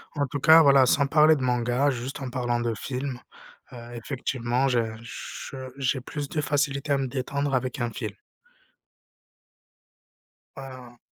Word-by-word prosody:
En 145 -1 0
tout 145 - -4
cas, 160 +2 +8
voilà, 140 -3 +6
sans 140 +2 +3
parler 155 +1 +5
de - - -5
manga, 125 +2 +1
juste 130 +1 -4
en 135 -2 -5
parlant 120 -1 -1
de 120 -1 -1
film, 130 +2 -4 0.5
heu, - - -10 0.2
effectivement 125 +1 -1
j'ai 120 -3 +2 0.2
je 115 +3 -8 0.2
j'ai 135 -1 0
plus 145 +2 -5
de 150 - -1
facilité 140 0 -1
à 140 - +4
me 135 -1 -1
détendre 140 +2 -2
avec 130 +1 -2
un 120 - -1
film. - - -5 2.4
Heu 130 -3 -10
130 Hz, 150 wpm, -26 LUFS, 125-140 Hz, 2.4 s, cas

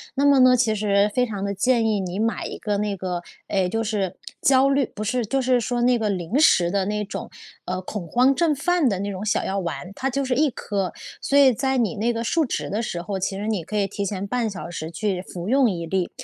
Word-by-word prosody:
那 280 +1 +2
么 280 -1 +6
呢， 255 0 +6
其 230 -2 +2
实 205 -1 +2
非 250 - +3
常 205 -4 -4
地 200 - -2
建 235 +3 +2
议 215 -2 +1
你 185 0 -4
买 225 +1 -1
一 - - -5
个 210 -2 -2
那 205 -1 -1
个， 180 -1 -3 0.3
哎， 190 -3 +1
就 225 +4 -1
是 205 -4 -2 0.3
焦 270 0 +4
虑 275 -1 +2
不 215 - -7
是， 240 +3 0
就 270 +6 0
是 250 -1 +2
说 240 +1 -1
那 245 0 +4
个 215 -1 0
临 190 +4 -1
时 175 - +5
的 195 -1 +1
那 210 +1 -2
种， 195 - -6 0.4
呃， 185 0 -2
恐 185 -2 -5
慌 250 +8 +4
症 330 -1 +2
犯 340 0 +2
的 195 -4 -1
那 200 +1 -3
种 190 +1 -5
小 215 - 0
药 195 +1 -1
丸， 180 0 -5
它 270 - -1
就 275 +1 -1
是 255 - 0
1 300 +1 +3
颗。 200 -5 -3 0.3
所 280 - +1
以 270 -3 +7
在 265 +3 0
你 235 -2 0
那 225 +3 0
个 230 0 -3
述 320 +8 +1
职 - - -3
的 210 +3 -1
时 175 -6 -3
候， 195 +1 -3
其 195 +1 -2
实 205 +2 -4
你 210 -7 -1
可 210 - -4
以 200 - +2
提 200 +1 -4
前 200 0 -3
半 235 0 -1
小 195 -3 -7
时 160 -2 -5
去 185 +2 -2
服 180 -1 -7
用 260 +1 +4
1 170 -4 -3
粒， 185 +1 -1
210 Hz, 270 characters per minute, -23 LUFS, 195-250 Hz, 0.4 s, 以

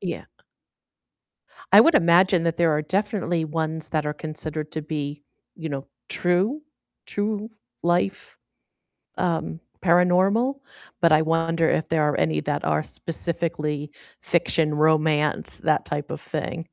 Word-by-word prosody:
Yeah. - - -5 1.5
I - - +10
would 330 - +5
imagine 175 - +4
that 165 -1 0
there 170 -1 +3
are 150 0 0
definitely 185 -2 -1
ones 160 0 -3
that 155 -2 -1
are 150 - -2
considered 155 0 -6
to 155 - -4
be, 145 -1 -4 0.3
you 160 -1 -6
know, 140 -2 -5 0.2
true 190 +12 0 0.4
true 210 +1 -2 0.4
life, 175 - 0 0.8
um, 165 -2 -1 0.2
paranormal, 190 +9 +3 0.4
but 165 -2 +5
I 155 - +6
wonder 165 +1 +1
if 160 - 0
there 160 -1 +2
are 145 - 0
any 80 -1 +1
that - - -2
are - - +1
specifically 155 -3 -3 0.3
fiction 165 -2 +1
romance, 150 0 +2
that 155 -1 +1
type 145 0 -4
of - - -6
thing. 160 +1 -4
160 Hz, 135 wpm, -24 LUFS, 150-175 Hz, 1.5 s, I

